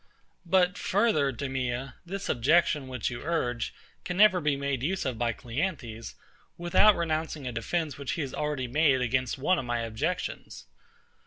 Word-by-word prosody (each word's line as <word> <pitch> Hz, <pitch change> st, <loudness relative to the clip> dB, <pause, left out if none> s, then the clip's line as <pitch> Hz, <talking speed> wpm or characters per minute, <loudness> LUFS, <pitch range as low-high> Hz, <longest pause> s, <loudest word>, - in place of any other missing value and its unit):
But 180 Hz, 0 st, +3 dB
further, 190 Hz, -9 st, +2 dB
DEMEA; 130 Hz, 0 st, -3 dB
this 195 Hz, +2 st, -4 dB
objection 145 Hz, +2 st, +2 dB
which 130 Hz, -2 st, -3 dB
you 120 Hz, -, -6 dB
urge 125 Hz, -7 st, -1 dB, 0.3 s
can 180 Hz, 0 st, -4 dB
never 200 Hz, -3 st, +6 dB
be 150 Hz, -1 st, +1 dB
made 140 Hz, -2 st, -2 dB
use 180 Hz, +7 st, -1 dB
of 125 Hz, -4 st, -2 dB
by 120 Hz, -1 st, +1 dB
CLEANTHES, 120 Hz, -, -4 dB, 0.4 s
without 175 Hz, +5 st, +5 dB
renouncing 160 Hz, -3 st, -2 dB
a 125 Hz, -, -2 dB
defence 145 Hz, +6 st, -2 dB
which 140 Hz, -, -3 dB
he 165 Hz, -, -2 dB
has 135 Hz, -3 st, -4 dB
already 150 Hz, -4 st, -2 dB
made 140 Hz, 0 st, +3 dB
against 130 Hz, +1 st, 0 dB
one 175 Hz, +7 st, +2 dB
of -, -, -4 dB
my 120 Hz, -1 st, -1 dB
objections. 115 Hz, -1 st, -3 dB
140 Hz, 160 wpm, -28 LUFS, 125-170 Hz, 0.4 s, never